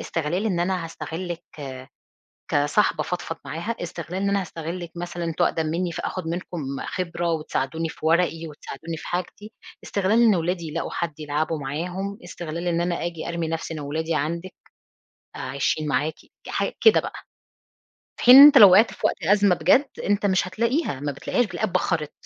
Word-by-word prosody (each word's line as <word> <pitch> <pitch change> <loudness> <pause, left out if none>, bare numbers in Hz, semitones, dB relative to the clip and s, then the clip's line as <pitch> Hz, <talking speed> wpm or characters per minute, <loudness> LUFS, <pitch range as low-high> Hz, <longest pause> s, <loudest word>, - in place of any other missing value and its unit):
استغلال 175 +6 -2
إن 180 -5 0
أنا 180 -1 0
هاستغلِّك 165 +2 -6 1.1
كصاحبة 150 +3 +2
أفضفض 165 0 -4
معاها، 175 +9 -4
استغلال 175 +2 -5
إن 200 - +1
أنا 200 0 +1
هاستغلِّك 170 0 -6
مثلًا 175 0 -5
أنتم 165 -1 0
أقدم 160 -1 0
مِنِّي 175 +2 -1
فآخُد 170 0 -4
منكم 175 -1 -4 0.2
خِبرة 175 -1 -2
وتساعدوني 160 +1 -2
في 160 - -9
ورقي 165 -1 +1
وتساعدوني 160 +2 -8
في - - -9
حاجتي، 185 +5 -5 0.3
استغلال 205 +4 +1
إن 220 -4 +5
ولادي 170 0 -2
يلاقوا 165 +2 -4
حد 165 -3 -4
يلعبوا 155 +1 -2
معاهم، 180 +8 -4
استغلال 170 +1 -6
إن 170 0 +1
أنا 175 -1 -1
أجِي 170 -2 -5
أرمِي 170 -1 -2
نفسي 165 0 -4
أنا 155 - -5
وولادي 160 +3 -2
عندِك، 170 +5 -3 0.8
آآ - - -7
عايشين 140 +3 -1
معاكِ 150 +3 0 0.3
حاج - - -1
كده 445 - +6
بقى، - - -7 1.0
في - - -4
حين 250 +2 +10
إن 280 - +12
أنت 290 -2 +10
لو 200 -4 +10
وقعت 210 +5 +6
في - - -19
وقت - - -2
أزمة 200 0 +4
بجد، 185 - +3 0.2
أنت 205 0 +1
مش 190 -1 +1
هتلاقيها، 235 - -1
ما 145 0 -2
بتلاقيهاش 240 - 0
بتلاقيها 215 - -2
اتبخّرت. 165 -4 -1
170 Hz, 170 wpm, -24 LUFS, 160-185 Hz, 1.1 s, إن